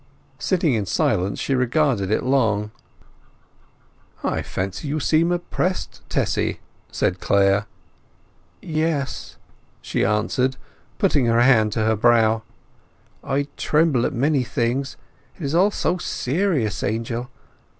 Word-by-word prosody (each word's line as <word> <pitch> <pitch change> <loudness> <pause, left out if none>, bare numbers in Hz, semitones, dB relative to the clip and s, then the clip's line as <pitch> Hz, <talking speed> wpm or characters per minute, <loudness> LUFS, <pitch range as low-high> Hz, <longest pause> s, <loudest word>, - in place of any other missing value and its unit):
Sitting 175 -7 +1
in 105 -4 -1
silence 100 -1 0
she 140 - -1
regarded 125 -5 +1
it 110 - +1
long. 110 -6 +1 1.5
"I - - 0
fancy 95 +9 -4
you 150 +2 -1
seem 165 +4 +2
oppressed, 175 +1 -2
Tessy," - - 0 0.3
said - - 0
Clare. 100 +1 +2 1.0
"Yes," 155 -3 -2 0.4
she - - -2
answered, 115 +6 +1 0.4
putting 130 -5 +2
her 115 +1 +3
hand 115 -4 +4
to 110 -1 0
her 110 0 +3
brow. 110 0 +3 0.8
"I 140 +1 0
tremble 150 -5 +2
at - - -4
many 135 +2 +1
things. 125 +3 -2 0.4
It 175 - -10
is 140 +1 -2
all 185 +5 +4
so 180 -3 -1
serious, 145 - -1
Angel. 115 +3 -2
125 Hz, 120 wpm, -22 LUFS, 110-155 Hz, 1.5 s, hand